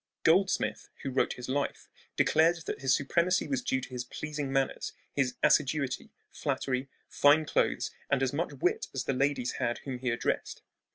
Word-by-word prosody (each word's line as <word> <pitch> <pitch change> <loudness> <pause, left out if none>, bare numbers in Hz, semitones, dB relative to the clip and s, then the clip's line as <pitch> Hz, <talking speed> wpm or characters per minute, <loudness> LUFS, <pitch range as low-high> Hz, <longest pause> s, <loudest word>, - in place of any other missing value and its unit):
Goldsmith, 185 +4 +2
who 135 - -2
wrote 130 - +1
his 125 - -8
life, 140 +2 -2 0.3
declared 165 +1 +3
that - - -4
his 135 -1 +1
supremacy 170 +6 +1
was 135 -3 -1
due 130 - 0
to 130 - -8
his 125 -1 -4
pleasing 150 +1 -4
manners, 135 -1 -1 0.2
"his 135 -3 +1
assiduity, 135 -2 +2 0.2
flattery, 130 0 -2 0.2
fine 150 +2 +4
clothes, - - +1 0.2
and 135 -1 +2
as 130 - 0
much 165 +5 -1
wit 140 +6 0
as 130 - -1
the 135 - -1
ladies 135 -1 +1
had 120 - 0
whom 130 -3 -5
he 125 0 -1
addressed." 115 - -2
135 Hz, 170 wpm, -30 LUFS, 130-150 Hz, 0.3 s, fine